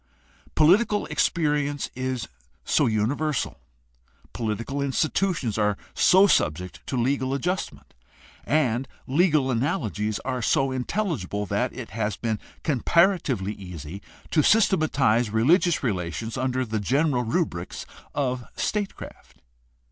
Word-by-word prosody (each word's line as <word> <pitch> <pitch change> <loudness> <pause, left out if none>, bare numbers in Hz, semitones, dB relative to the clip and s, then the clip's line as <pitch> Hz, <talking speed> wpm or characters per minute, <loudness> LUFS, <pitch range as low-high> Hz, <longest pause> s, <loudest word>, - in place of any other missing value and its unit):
Political 205 +7 +4
experi 150 -4 +1
ence 145 -1 -4
is 130 -1 -3 0.4
so - - +3
universal, 125 +7 -1 0.7
political 115 +5 -3
institutions 140 - 0
are 105 -1 +1 0.2
so 190 +2 +6
subject 90 - +1
to 130 - -2
legal 130 +2 0
adjustment, 180 +6 -3 0.5
and 130 -4 +1 0.2
legal 150 -2 +2
analogies 115 - -1
are 130 -1 -2
so 135 +4 +2
intelligible, 130 - -2
that - - -1
it - - -8
has 105 -1 -2
been 110 -3 -2 0.2
comparatively 150 - +2
easy 90 -2 -8 0.3
to 155 - +4
systematize 150 - +3
religious 155 - +3
relations 110 0 -2
under 130 0 -1
the 110 -1 -2
general 135 +4 +1
rubrics 115 - -2 0.3
of 130 -4 -1
statecraft. 205 - -5
130 Hz, 110 wpm, -25 LUFS, 110-155 Hz, 0.7 s, so